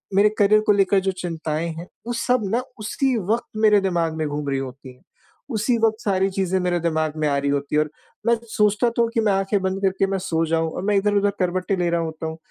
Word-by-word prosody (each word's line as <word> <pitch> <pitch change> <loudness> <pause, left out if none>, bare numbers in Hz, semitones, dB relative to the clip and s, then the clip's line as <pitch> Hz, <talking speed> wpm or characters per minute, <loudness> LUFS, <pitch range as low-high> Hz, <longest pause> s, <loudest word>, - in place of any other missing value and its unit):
मेरे 205 +2 +5
करियर 210 +1 +5
को - - +6
लेकर 200 -1 +3
जो 190 0 0
चिंताएँ 165 -3 -3
हैं, 170 +3 -8 0.2
वो 240 - -1
सब 250 +1 +1
ना 245 - +1 0.2
उसी 250 +4 0 0.2
वक़्त 235 +1 0
मेरे 210 -2 +5
दिमाग़ 170 -4 0
में 155 -1 -2
घूम 145 0 -3
रही 135 -1 0
होती 130 0 -8
हैं, - - -27 0.5
उसी 235 0 +1
वक़्त 220 0 0
सारी 195 -2 +1
चीज़ें 190 -1 0
मेरे 180 -1 0
दिमाग़ 160 -2 -1
में 155 - +1
आ 140 -1 +1
रही 140 0 0
होती 140 +1 -1
है 150 - +4
और 155 - -2 0.4
मैं 235 - +5 0.2
सोचता 210 +2 +2
तो 235 0 -1
हूँ 230 - -1
कि 225 - +3
मैं 210 -2 +2
आँखें 195 +1 0
बंद 190 +1 -2
करके 195 0 +1
मैं 195 0 -1
सो 165 -3 0
जाऊँ 165 0 0
और - - -5
मैं 210 0 +2
इधर-उधर 205 0 +2
करवटें 185 +1 0
ले 175 -1 +1
रहा 170 0 +1
होता 160 0 -5
हूँ, 160 0 -6
190 Hz, 245 wpm, -22 LUFS, 160-210 Hz, 0.5 s, को